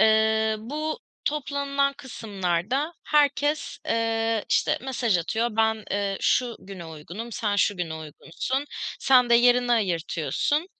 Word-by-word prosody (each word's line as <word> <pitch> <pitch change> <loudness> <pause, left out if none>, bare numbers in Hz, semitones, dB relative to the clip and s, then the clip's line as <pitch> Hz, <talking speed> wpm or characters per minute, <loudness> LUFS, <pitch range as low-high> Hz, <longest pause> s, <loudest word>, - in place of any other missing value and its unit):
Iıı, 220 0 +4
bu 305 - -3 0.3
toplanılan 280 -1 0
kısımlarda 225 - -2
herkes, 290 0 +1
ııı, 225 -1 +1
işte, - - +2
mesaj 240 -7 0
atıyor, 225 +8 0
ben, 220 -1 +2
ııı, 200 -1 0
şu 245 -2 +1
güne 185 -3 -9
uygunum, 170 +9 -8
sen 205 -2 -1
şu 205 0 +2
güne 170 -3 -3
uygunsun, 165 - -4 0.4
sen 250 -2 +5
de - - +7
yerini 245 0 +5
ayırtıyorsun. 205 - 0
225 Hz, 120 wpm, -25 LUFS, 200-270 Hz, 0.4 s, de